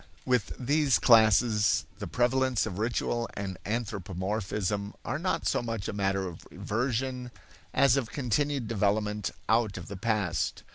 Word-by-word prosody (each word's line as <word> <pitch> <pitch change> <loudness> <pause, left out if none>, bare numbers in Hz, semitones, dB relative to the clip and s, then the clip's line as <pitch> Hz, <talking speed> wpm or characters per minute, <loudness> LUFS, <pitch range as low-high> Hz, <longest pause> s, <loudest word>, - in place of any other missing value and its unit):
With 125 -6 +1
these 140 - +3
classes 110 0 +4
the - - -4
prevalence 125 -1 +1
of 100 -3 -5
ritual 120 +1 -1
and 95 -2 -5
anthropomorphism 100 -1 -2
are - - -2
not - - -1
so - - +1
much 115 -4 -4
a - - -3
matter 95 -1 0
of 85 -2 -9
reversion 125 +2 -2 0.4
as 140 -1 +4
of 125 -5 -1
continued 140 -1 0
development 105 -1 0 0.2
out 110 -3 +2
of 90 - -8
the 100 - -6
past. 100 -5 -1
110 Hz, 140 wpm, -29 LUFS, 100-125 Hz, 0.4 s, classes